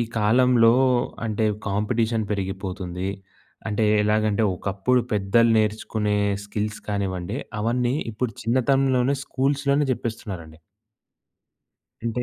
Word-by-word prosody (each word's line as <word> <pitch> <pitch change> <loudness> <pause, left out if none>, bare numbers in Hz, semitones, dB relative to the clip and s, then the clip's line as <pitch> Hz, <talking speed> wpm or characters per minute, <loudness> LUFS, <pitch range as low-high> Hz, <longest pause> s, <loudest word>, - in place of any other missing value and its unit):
ఈ - - +3 0.2
కాలంలో 115 +1 +5 0.5
అంటే 110 0 -1 0.2
కాంపిటీషన్ 110 +2 0
పెరిగిపోతుంది. 95 -2 -4 0.6
అంటే 110 +1 0 0.2
ఎలాగంటే 105 0 +1
ఒకప్పుడు 100 +7 0
పెద్దలు 105 +3 +3
నేర్చుకునే 105 -1 0 0.3
స్కిల్స్ 105 +1 -4
కానివ్వండి, 100 0 -2 0.2
అవన్నీ 120 +3 0 0.2
ఇప్పుడు 115 +2 -3
చిన్నతనంలోనే 130 +2 +2
స్కూల్స్‌లోనే 140 +2 +1
జెప్పేస్తున్నారండి. 100 -10 -5 1.5
అంటే, 115 +1 -1
110 Hz, 90 wpm, -24 LUFS, 100-125 Hz, 1.5 s, కాలంలో